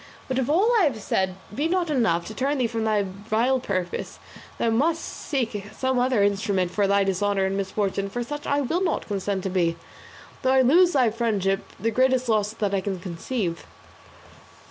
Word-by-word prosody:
But 260 0 -1
if 260 - -1
all 385 +10 +4
I 375 - +5
have 255 -7 -1
said 190 -2 -1 0.2
be 290 +8 0
not 345 -2 0
enough 225 - +1
to 220 - -7
turn 275 +5 0
thee 255 - +1
from 225 -1 -2
thy 215 -2 +2
vile 215 +7 0
purpose, 185 -7 -3 0.4
thou 230 - +1
must 315 +8 +1
seek 230 - -3
some 260 -1 +1
other 245 -4 +2
instrument 200 -3 +1
for 200 0 +1
thy 200 0 +3
dishonour 195 +1 +1
and 190 0 -1
misfortune; 195 0 -1
for 240 +4 -3
such 295 +4 -6
I 285 0 +2
will 335 +8 0
not 340 - -1
consent 195 -2 -2
to 190 - -1
be, 170 -3 +1 0.7
though 260 -1 +2
I 265 - +5
lose 345 +8 +5
thy 255 -5 +3
friendship, 205 -4 0 0.2
the 230 - 0
greatest 255 +1 +2
loss 210 -2 +2
that 210 -3 -2
I 195 - +1
can 190 -1 -3
conceive." 175 +1 -4
220 Hz, 190 wpm, -25 LUFS, 195-260 Hz, 0.7 s, I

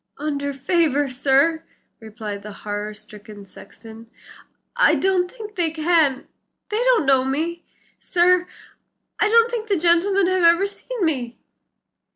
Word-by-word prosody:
"Under 285 -1 -3
favor, 285 0 0
sir," 280 +5 +1 0.4
replied 215 -2 -8
the 210 +1 -9
horror 210 0 -4
stricken 210 -1 -13
sexton, 225 +3 -14 0.7
"I - - +4
don't 370 -2 +1
think 430 0 -10
they 345 -5 0
can; 315 -4 +1 0.4
they 425 - -2
don't - - +3
know 265 -1 +3
me, 320 +6 -3 0.4
sir; 360 +1 +2 0.7
I 420 - +2
don't 465 +1 +4
think 455 -2 -4
the 400 -2 +1
gentlemen 355 +4 +2
have 370 0 +1
ever 340 +3 +5
seen 410 +1 -5
me." 250 -6 -3
320 Hz, 135 wpm, -21 LUFS, 250-365 Hz, 0.7 s, ever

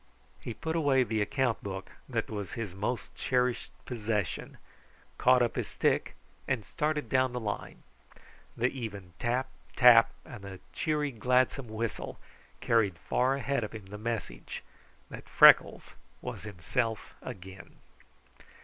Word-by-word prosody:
He 115 - -6
put 160 0 -3
away 140 -5 +4
the 110 -3 -1
account 125 +2 0
book, 95 -1 -6 0.2
that - - -1
was 105 -4 -5
his 110 -6 -4
most 105 +6 -3
cherished 125 -1 0 0.2
possession, 105 - -2 0.6
caught 125 0 +5
up 120 - -1
his - - -2
stick, - - 0 0.3
and 125 -6 -1
started 150 -1 -1
down 130 +1 +2
the 125 - -2
line. 105 -3 -5 0.7
The 120 +2 +2
even 105 -9 -7
tap, 125 +2 0 0.3
tap, 115 -2 +8 0.2
and 120 -5 -10
the 95 -1 -8
cheery, 150 -2 0
gladsome 125 +2 +1
whistle 110 +1 -4 0.4
carried 105 -6 +2
far 125 - +1
ahead 140 -1 -1
of 105 - -5
him 110 -3 -8
the 105 - -6
message 105 - -4 0.5
that - - -9
Freckles - - +6 0.3
was - - -6
himself 105 +4 -2
again. 95 0 -9
115 Hz, 135 wpm, -30 LUFS, 105-130 Hz, 0.7 s, tap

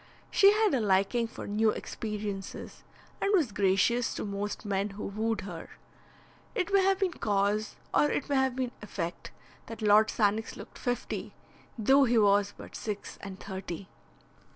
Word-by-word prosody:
She 395 0 +7
had 430 -4 +2
a 265 - +3
liking 200 +4 +2
for 225 - -8
new 215 +2 +2
experiences, 210 -3 -5 0.4
and 395 - +2
was 305 - +2
gracious 200 +5 +2
to - - -3
most 205 +1 -4
men 200 0 0
who 200 +1 -7
wooed 220 +2 -1
her. 175 -4 -8 0.9
It 380 +2 -1
may 395 - +6
have 385 0 +3
been 380 -3 0
cause 205 -1 0 0.2
or 295 - +4
it - - -1
may 280 - +1
have 265 -1 +2
been 255 -2 -2
effect 175 -5 -5 0.4
that 225 -1 -7
Lord 210 +1 +6
Sannox 215 0 0
looked - - -11
fifty, 245 -1 -3 0.4
though 270 +5 +5
he 240 -1 +2
was 205 -1 +4
but - - -10
six 210 -2 -5
and 195 -1 -8
thirty. 190 -1 -6
215 Hz, 160 wpm, -29 LUFS, 200-245 Hz, 0.9 s, She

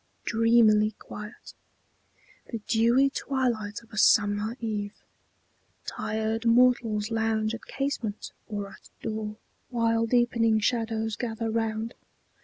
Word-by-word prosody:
Dreamily 220 -2 +4
quiet 210 +2 -10 1.0
The 230 - -3
dewy 240 +4 +3
twilight 235 -7 -2
of 225 - -22
a 215 - -1
summer 205 +4 +3
eve. 210 -3 -3 0.9
Tired 220 +1 -2
mortals 230 -3 +3
lounge 220 -1 0
at 230 - -7
casement 265 -6 -3 0.2
or 205 -2 -4
at - - -16
door, 215 -1 -4 0.3
While 230 -1 +1
deepening 230 -2 +3
shadows 225 -1 -1
gather 225 -1 -3
round. 225 0 -2
225 Hz, 105 wpm, -27 LUFS, 215-235 Hz, 1.0 s, Dreamily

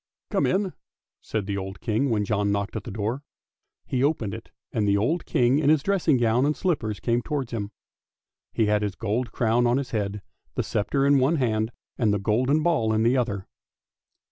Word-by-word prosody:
" - - -51
Come - - +2
in," 190 -1 0 0.5
said 110 -3 -3
the 100 0 -2
old 95 +1 -6
King 120 +5 0
when 105 -3 +1
John 100 -1 +1
knocked 100 +1 -2
at 110 - -4
the - - -5
door. 110 +6 -2 0.6
He 130 0 -1
opened 130 -9 0
it, - - -8 0.2
and 105 -2 +1
the 100 0 +3
old 155 - 0
King 130 -1 +3
in 145 -2 +2
his 155 -2 +4
dressing 175 -7 +2
gown 120 +1 +2
and 150 +1 +1
slippers 120 - -1
came 120 0 +1
towards 140 -3 -3
him. 105 -4 -3 0.8
He 110 - +1
had 105 0 +2
his 100 -2 -2
gold 115 +2 -2
crown 120 +2 +2
on 120 +2 +3
his 140 -2 -3
head, 105 -2 -2 0.3
the - - 0
sceptre 135 +7 0
in 140 -1 +5
one 135 +6 +3
hand, 110 -5 0 0.3
and 110 -4 +3
the 105 - +2
golden 125 +10 +1
ball 150 -11 +2
in 110 0 +2
the 120 +3 +3
other. 105 -6 -1
115 Hz, 205 wpm, -25 LUFS, 105-140 Hz, 0.8 s, in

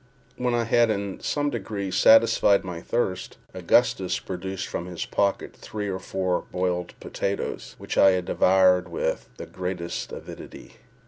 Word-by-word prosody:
When 125 -1 0
I 120 - +1
had 115 0 +3
in 100 -2 -2
some 145 -1 -1
degree 100 -4 -4
satisfied 110 -2 +5
my 90 -3 -6
thirst, 95 -5 -2 0.2
Augustus 90 -1 +2
produced 95 0 -5
from 85 - -5
his 90 -2 -5
pocket 100 -1 -1
three 105 -1 -5
or 95 -1 -3
four 95 -1 -2
boiled 90 -1 -2
potatoes, 100 0 -4
which - - -3
I 95 -1 +6
devoured 90 0 +3
with 85 - -2
the - - -7
greatest 90 -2 -5
avidity. - - -10
95 Hz, 140 wpm, -25 LUFS, 90-105 Hz, 0.2 s, I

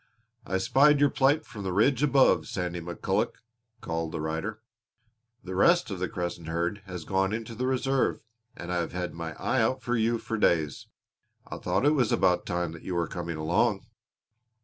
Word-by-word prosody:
"I 95 - 0
spied 140 +9 +4
your 145 -1 +4
plight 140 +3 +2
from 105 - -9
the 95 -1 -3
ridge 115 +9 +3
above, 140 -2 +4
Sandy 90 -2 -3
McCulloch," 85 0 -1 0.5
called 80 -1 -3
the - - -4
rider. 80 +8 -3 0.8
"The 95 - -6
rest 170 - +3
of 95 - -4
the 95 - -2
Crescent 85 -5 -4
herd 85 +5 -2
has 90 -3 -6
gone 95 +2 0
in 115 +1 -2
to 115 - -8
the 125 +3 -2
Reserve 130 0 +1 0.4
and 85 +1 -5
I - - 0
have 85 - -2
had 90 0 -3
my 80 0 -5
eye 130 -2 0
out 130 +3 0
for 120 0 0
you 115 0 +2
for 115 0 -4
days. 80 -8 +1 0.6
I - - -7
thought - - 0
it 145 - +6
was 125 -7 +2
about - - +2
time 85 -2 -1
that 80 - -10
you 90 - -4
were 85 -1 +1
coming 85 -2 -5
along." 90 +7 +1
95 Hz, 195 wpm, -28 LUFS, 85-125 Hz, 0.8 s, it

